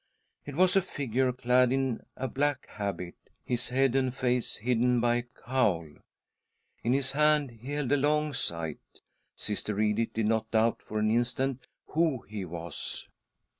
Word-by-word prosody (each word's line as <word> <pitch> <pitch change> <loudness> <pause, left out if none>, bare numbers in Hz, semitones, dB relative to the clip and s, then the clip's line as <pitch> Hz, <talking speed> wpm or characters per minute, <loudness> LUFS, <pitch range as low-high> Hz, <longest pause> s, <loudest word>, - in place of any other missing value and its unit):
It 145 - -6
was 185 +3 +4
a 195 - +6
figure 130 -5 0
clad 125 0 +3
in 135 -3 0
a 130 - -2
black 140 +2 0
habit, 100 -4 -4 0.3
his 120 -1 -1
head 130 0 +2
and 130 -1 +2
face 125 -1 0
hidden 125 +2 +2
by 120 0 +3
a - - 0
cowl. 120 -8 0 1.0
In 120 - +1
his 135 0 +1
hand 150 -1 +3
he 120 +5 -8
held 145 -3 -1
a 145 - +5
long 150 +1 +1
scythe. 85 - -2 0.6
Sister 105 0 -2
Edith 110 +1 +1
did 110 -1 0
not 110 0 +1
doubt 115 +1 +2
for 110 - -5
an 110 0 +2
instant 125 +2 0 0.2
who 155 -6 +1
he 105 -3 -6
was. 85 -2 -4
125 Hz, 160 wpm, -29 LUFS, 110-135 Hz, 1.0 s, a